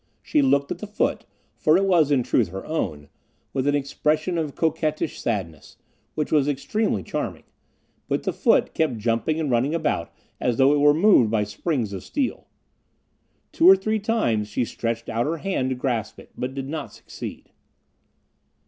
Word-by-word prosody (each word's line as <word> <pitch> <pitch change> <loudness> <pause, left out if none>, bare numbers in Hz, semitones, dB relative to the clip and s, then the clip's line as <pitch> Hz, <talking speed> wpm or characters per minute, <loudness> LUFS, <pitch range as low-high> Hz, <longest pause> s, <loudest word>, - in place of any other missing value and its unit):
She 300 - +2
looked 140 - +2
at - - -3
the 215 - -6
foot, 210 - -1 0.3
for 155 +2 +3
it 195 - +2
was 170 -6 +4
in 135 -4 +3
truth 115 -2 +2
her 95 +3 -7
own, 75 - -3 0.5
with 135 0 -1
an 145 - +3
expression 150 +4 0
of 150 -3 -3
coquettish 155 -1 -1
sadness, 85 -7 -4 0.4
which 150 - -2
was 145 -3 +3
extremely 145 - -1
charming; - - -4 0.6
but - - -1
the - - -1
foot - - +2
kept 155 -7 0
jumping 115 +8 0
and 150 -4 -1
running 130 +7 +1
about 155 - -1 0.3
as 120 -2 0
though 135 +2 +5
it 145 - +2
were 145 0 +5
moved 165 - +5
by 110 -1 +1
springs 110 - -2
of 95 - -6
steel. 280 -3 -3 1.0
Two 340 +3 +6
or 385 - +10
three 220 - -1
times 200 - 0
she 110 +4 -1
stretched 115 0 -3
out 115 +3 -1
her 165 +2 -1
hand 165 -7 -1
to 130 - -1
grasp 120 -4 -2
it, - - -15
but 130 +2 -4
did 135 -1 -4
not 150 0 -5
succeed. - - -9
145 Hz, 175 wpm, -24 LUFS, 115-160 Hz, 1.0 s, or